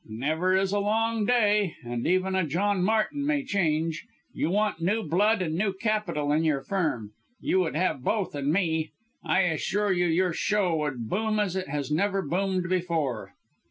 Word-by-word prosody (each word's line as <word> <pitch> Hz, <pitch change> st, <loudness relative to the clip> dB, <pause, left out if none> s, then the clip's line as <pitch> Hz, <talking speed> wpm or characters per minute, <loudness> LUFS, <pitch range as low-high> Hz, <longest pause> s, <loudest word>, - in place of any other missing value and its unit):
"Never 155 Hz, +11 st, 0 dB
is 190 Hz, 0 st, +1 dB
a 205 Hz, -, +1 dB
long 220 Hz, +1 st, 0 dB
day 210 Hz, -6 st, +2 dB
and 120 Hz, 0 st, -3 dB
even 185 Hz, +2 st, +1 dB
a 190 Hz, 0 st, +2 dB
John 185 Hz, +5 st, 0 dB
Martin 220 Hz, +8 st, +1 dB
may 290 Hz, -1 st, 0 dB
change. 165 Hz, -, -1 dB, 0.3 s
You -, -, -1 dB
want 205 Hz, -2 st, 0 dB
new 210 Hz, +6 st, +1 dB
blood 200 Hz, +6 st, +2 dB
and 160 Hz, -2 st, -2 dB
new 195 Hz, +2 st, 0 dB
capital 190 Hz, -8 st, -1 dB
in 155 Hz, +2 st, +2 dB
your 150 Hz, -4 st, +1 dB
Firm 150 Hz, -, -2 dB, 0.3 s
you 190 Hz, -, +1 dB
would 175 Hz, -4 st, -1 dB
have 160 Hz, -6 st, 0 dB
both 205 Hz, +3 st, -1 dB
in 145 Hz, 0 st, -1 dB
me. 160 Hz, -3 st, 0 dB, 0.3 s
I 190 Hz, -, +2 dB
assure 190 Hz, +4 st, 0 dB
you 175 Hz, -1 st, +1 dB
your 175 Hz, +2 st, +1 dB
show 195 Hz, -2 st, +1 dB
would 135 Hz, -7 st, -3 dB
boom 215 Hz, -, 0 dB
as 195 Hz, -3 st, 0 dB
it 185 Hz, -5 st, -3 dB
has 145 Hz, 0 st, -3 dB
never 195 Hz, +4 st, +1 dB
boomed 185 Hz, 0 st, -1 dB
before!" 170 Hz, -9 st, -2 dB
185 Hz, 180 wpm, -27 LUFS, 160-205 Hz, 0.3 s, day